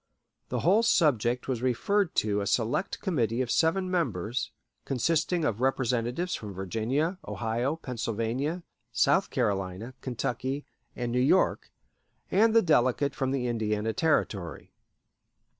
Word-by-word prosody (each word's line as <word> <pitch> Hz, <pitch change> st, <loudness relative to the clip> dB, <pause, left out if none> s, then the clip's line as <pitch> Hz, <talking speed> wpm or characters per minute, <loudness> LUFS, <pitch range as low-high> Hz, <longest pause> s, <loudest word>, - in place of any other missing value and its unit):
The -, -, -2 dB
whole 195 Hz, +7 st, +4 dB
subject 125 Hz, -, +2 dB
was 125 Hz, -3 st, -2 dB
referred 170 Hz, -, +1 dB
to 105 Hz, -1 st, +1 dB
a 100 Hz, -, -3 dB
select 130 Hz, -, 0 dB
committee 120 Hz, -, 0 dB
of 120 Hz, -, -4 dB
seven 185 Hz, +3 st, +2 dB
members, 120 Hz, -, -1 dB, 0.3 s
consisting 160 Hz, +5 st, 0 dB
of 115 Hz, -4 st, -1 dB
representatives 130 Hz, +5 st, 0 dB
from 105 Hz, -3 st, -5 dB
Virginia, 120 Hz, -, -1 dB
Ohio, 120 Hz, +6 st, -1 dB
Pennsylvania, 125 Hz, -, -3 dB, 0.3 s
South 190 Hz, -, +3 dB
Carolina, 105 Hz, -1 st, -2 dB
Kentucky, 130 Hz, +3 st, -3 dB, 0.3 s
and 120 Hz, -1 st, -3 dB
New 125 Hz, -, +1 dB
York, 145 Hz, +9 st, +2 dB, 0.6 s
and 220 Hz, +3 st, +4 dB
the 230 Hz, -, +6 dB
delegate 140 Hz, -3 st, +2 dB
from 135 Hz, -, -1 dB
the 135 Hz, -2 st, -1 dB
Indiana 110 Hz, -2 st, -1 dB
Territory. 100 Hz, -, -1 dB
125 Hz, 125 wpm, -28 LUFS, 115-160 Hz, 0.6 s, the